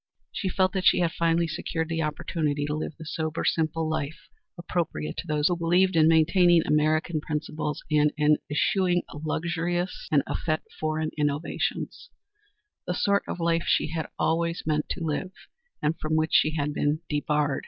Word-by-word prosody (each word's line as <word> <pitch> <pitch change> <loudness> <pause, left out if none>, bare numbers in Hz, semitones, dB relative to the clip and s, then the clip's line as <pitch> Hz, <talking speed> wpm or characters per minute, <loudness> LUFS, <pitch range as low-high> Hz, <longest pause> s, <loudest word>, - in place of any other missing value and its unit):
She 190 - -2
felt 185 0 +1
that 190 -2 -1
she - - +6
had 170 -2 +2
finally 170 0 +1
secured 160 0 -3
the 165 0 -1
opportunity 150 -1 -1
to 150 - -2
live 155 0 -4
the 160 - -9
sober, 160 0 -3
simple 160 0 0
life 155 -1 -4 0.3
appropriate 165 - -3
to 175 - -5
those 150 -1 +2
who 175 - +1
believed 175 +2 +2
in 160 -1 +6
maintaining 165 +1 +5
American 155 +1 +1
principles, 150 0 -3
and 150 0 +4
in 150 0 +4
eschewing 175 +5 +2
luxurious 170 +4 -2
and 145 -3 +4
effete 155 -2 -1 0.2
foreign 155 0 -1
innovations; 145 +1 -2 0.8
the 180 - -1
sort 200 +1 +2
of - - -4
life 170 0 +1
she - - +2
had 160 0 -3
always 165 +1 0
meant 150 -1 0
to 170 - -3
live, 170 +5 -2 0.5
and 150 +2 0
from 155 0 -1
which 160 0 +1
she 155 +1 +4
had 150 -1 -1
been 150 +2 0
debarred. 150 -1 0
160 Hz, 165 wpm, -26 LUFS, 150-170 Hz, 0.8 s, she